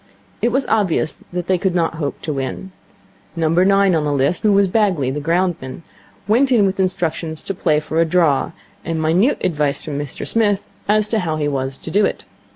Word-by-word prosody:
It 240 - +2
was 265 +3 +1
obvious 190 -7 0
that 175 -1 -3
they 185 0 +1
could 185 -1 0
not 165 -2 0
hope 145 - -4
to 155 - -2
win. 135 +8 -5 0.6
Number 165 +2 +2
nine 195 0 +4
on 160 -2 +1
the 150 - -1
list, 140 +5 +1
who 215 - +3
was 200 0 +4
Bagley, 180 - +1
the 145 - -3
ground 175 +4 0
man, 130 +5 -8 0.4
went 255 +6 +3
in 225 -5 +4
with 195 0 -1
instructions 165 -3 -2
to 195 - -3
play 155 -4 +1
for 155 +2 -1
a - - +3
draw, 160 -4 +2 0.3
and 165 -1 -3
minute 175 - +2
advice 150 -5 0
from 145 -2 -4
Mr 145 -3 -5
Smith 210 -3 +1 0.2
as 210 0 +3
to 220 - +1
how 165 -5 -2
he 150 -1 -1
was 135 -1 -3
to - - -8
do 205 +2 +3
it. - - -1
175 Hz, 210 wpm, -19 LUFS, 150-200 Hz, 0.6 s, nine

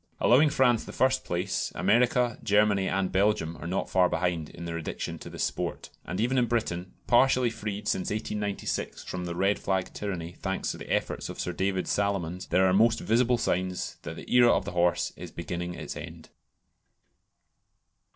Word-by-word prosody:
Allowing 145 +5 +5
France 125 -5 +3
the - - -9
first 130 0 +2
place, 90 +3 -2
America, 120 +5 +2
Germany, 105 -1 +3
and 95 -1 0
Belgium 95 -4 +1
are 85 - -7
not 95 +2 -1
far 90 -1 +3
behind 85 -2 -1
in 85 - -9
their 85 -1 -4
addiction 85 -1 -4
to - - -9
the - - -9
"sport," - - -3
and 90 - -4
even 125 +4 +2
in 120 - +2
Britain, 95 -6 -2
partially 125 -1 +4
freed 105 -2 -5
since 95 - 0
1896 105 -1 -3
from 90 -1 -5
the 85 -1 -4
red 100 +3 +1
flag 95 -1 -1
tyranny, 90 -5 -4
thanks 95 0 -2
to - - -8
the - - -8
efforts - - -1
of - - -7
Sir 90 - -2
David 95 +1 -1
Salomons, 95 -3 -1
there 95 +1 +3
are 95 - +3
most 110 +3 +4
visible 120 +2 +2
signs 90 -4 -2
that - - -6
the - - -10
era 120 -1 +7
of 95 - +1
the 100 - -4
horse 85 0 +1
is 90 - -8
beginning 85 +1 -5
its - - -6
end. - - -9
95 Hz, 180 wpm, -28 LUFS, 90-110 Hz, -, era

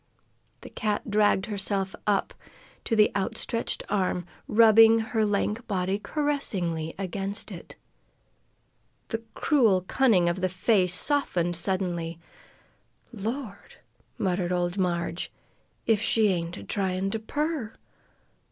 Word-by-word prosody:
The - - -11
cat 210 0 -2
dragged 205 -2 +3
herself 195 -2 -1
up 200 -2 +1 0.5
to 225 - 0
the 215 -1 +5
outstretched 205 +3 -2
arm, 185 -3 0 0.2
rubbing 225 0 +7
her 220 0 0
lank 210 +2 -1
body 190 0 -1
caressingly 195 - -2
against 195 +2 -4
it. - - -10 1.3
The 225 -1 -3
cruel, 230 - +3
cunning 185 -2 +3
old 185 +1 0
face 185 -1 +2
softened 180 - +1
suddenly. 175 -2 0 1.0
"Lord!" 220 0 -6 0.4
muttered 180 -2 -1
old 175 0 0
Marg, 170 -2 -1 0.6
"if 225 -2 +2
she 220 -1 +3
ain't 175 -1 -2
a - - -8
tryin' 190 -1 -1
to 225 - -2
purr! 290 0 -3
200 Hz, 110 wpm, -27 LUFS, 180-225 Hz, 1.3 s, rubbing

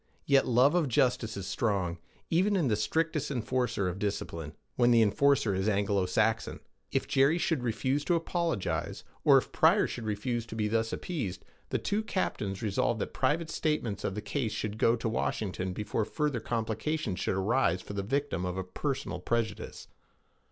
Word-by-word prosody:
Yet 140 -1 +4
love 125 +5 +5
of 175 -4 +2
justice 120 -3 +1
is 95 - -5
strong, 95 -5 -1 0.3
even 190 +5 +3
in 165 -9 +2
the 105 - +3
strictest 150 +7 0
enforcer 125 -5 -1
of 90 +1 -3
discipline 85 -6 -3 0.2
when 120 -1 +4
the 115 -2 +6
enforcer 110 +1 +3
is 95 +3 +1
Anglo 100 -2 +1
Saxon. 110 +4 0 0.3
If - - 0
Jerry 140 +5 +4
should 165 -5 0
refuse 130 +4 0
to 175 - +3
apologize, 165 - -2 0.2
or - - +7
if - - -1
Pryor - - +4
should 120 - -5
refuse 115 +2 -2
to 110 - -7
be 105 -1 0
thus 115 +1 0
appeased, 130 - -4 0.2
the - - 0
two 205 +2 -1
captains 110 - -2
resolved 105 -3 +1
that - - -3
private 165 +2 0
statements 135 -10 -1
of 95 - -2
the 105 - -3
case 120 -7 -2
should 110 0 -4
go 115 - +4
to 115 -1 -3
Washington 95 -4 -2
before 105 +3 -2
further 145 +2 -1
complications 110 - -2
should - - 0
arise 95 -1 +1
for - - -8
the 100 - -1
victim 135 -2 -1
of 90 0 -3
a 95 - -1
personal 130 +2 -3
prejudice. 115 +4 -3
115 Hz, 175 wpm, -30 LUFS, 100-140 Hz, 0.3 s, or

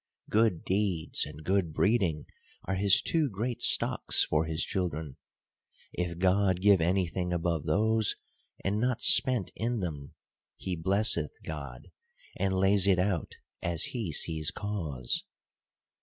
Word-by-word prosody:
Good 110 -6 +1
deeds 95 -7 -1
and 75 +1 -11
good 95 -3 0
breeding 95 -5 0 0.4
are 95 - -2
his 100 +7 +5
two 160 -4 +1
great 115 +4 -4
stocks - - +3
for 75 +1 0
his 80 0 -1
children; 80 -6 -4 0.8
if 85 -1 -4
God 95 0 +1
give 100 -2 +4
any 90 +3 +1
thing 90 +1 -4
above 85 -3 -2
those, 110 +6 +1 0.5
and 100 +2 0
not 125 0 -1
spent 125 -7 +5
in 115 +1 -2
them, 75 -7 -6 0.4
he 95 - -4
blesseth 90 -3 +1
God, 70 -5 -8 0.4
and 95 0 -1
lays 95 +1 +4
it 95 -2 +4
out 90 -2 -2 0.3
as 85 -1 -1
he 115 -9 -3
sees 80 0 0
cause. 80 -12 -3
95 Hz, 135 wpm, -28 LUFS, 80-100 Hz, 0.8 s, his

